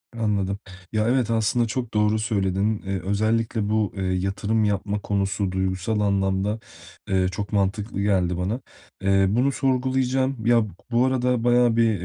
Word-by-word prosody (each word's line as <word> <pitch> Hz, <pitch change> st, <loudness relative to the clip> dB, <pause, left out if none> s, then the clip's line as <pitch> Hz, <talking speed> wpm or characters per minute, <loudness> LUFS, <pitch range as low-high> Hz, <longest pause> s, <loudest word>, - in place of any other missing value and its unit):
Anladım. 100 Hz, -3 st, -1 dB, 0.3 s
Ya, 110 Hz, 0 st, +1 dB
evet 125 Hz, -1 st, +1 dB
aslında 115 Hz, +1 st, +1 dB
çok 120 Hz, +1 st, -4 dB
doğru 105 Hz, 0 st, +2 dB
söyledin. 105 Hz, -1 st, 0 dB
Eee, 95 Hz, -1 st, -2 dB
özellikle 110 Hz, +2 st, 0 dB
bu, 110 Hz, -2 st, 0 dB
eee, 95 Hz, -, -2 dB
yatırım 95 Hz, +4 st, 0 dB
yapma 105 Hz, 0 st, -1 dB
konusu 100 Hz, -1 st, -1 dB
duygusal 95 Hz, +3 st, -1 dB
anlamda, 100 Hz, +1 st, 0 dB, 0.5 s
eee, 95 Hz, -1 st, +2 dB
çok 100 Hz, +1 st, -5 dB
mantıklı 100 Hz, +1 st, -1 dB
geldi 90 Hz, -4 st, +1 dB
bana. 105 Hz, +8 st, -2 dB, 0.4 s
Eee, 95 Hz, 0 st, +3 dB
bunu 125 Hz, +7 st, +2 dB
sorgulayacağım. 130 Hz, -2 st, 0 dB
Ya, 115 Hz, -2 st, +4 dB, 0.3 s
bu 120 Hz, +2 st, +3 dB
arada, 125 Hz, -2 st, +1 dB
bayağı 120 Hz, -1 st, +4 dB
bir 115 Hz, -5 st, +2 dB
105 Hz, 145 wpm, -24 LUFS, 95-115 Hz, 0.5 s, Ya